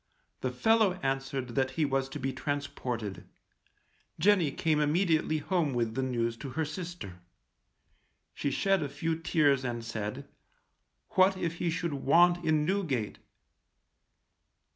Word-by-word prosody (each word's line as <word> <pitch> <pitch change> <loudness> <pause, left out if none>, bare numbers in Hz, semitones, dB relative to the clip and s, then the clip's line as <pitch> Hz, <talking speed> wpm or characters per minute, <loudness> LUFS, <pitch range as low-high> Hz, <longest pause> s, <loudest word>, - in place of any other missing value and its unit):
The - - -1
fellow 220 -5 +3
answered 135 -1 -2
that 130 +2 0
he 155 - +3
was 135 -1 0
to 150 - -6
be 135 0 -2
transported. 130 -7 -4 0.9
Jenny 190 -6 +4
came 155 +2 0
immediately 155 +1 +2
home 155 -3 0
with 115 -2 0
the 130 - -1
news 120 -3 -1
to 135 - -7
her 160 - +1
sister. 155 - -7 1.1
She 145 - -2
shed 195 +6 +1
a 145 - -2
few 160 +4 -2
tears 150 -5 +2
and 120 -2 -3
said, 110 -2 -5 0.8
what 190 +1 +4
if 170 -2 -2
he 175 - 0
should 170 -1 -2
want 175 +6 +4
in 155 -2 +2
Newgate? 155 - -1
145 Hz, 135 wpm, -30 LUFS, 130-170 Hz, 1.1 s, Jenny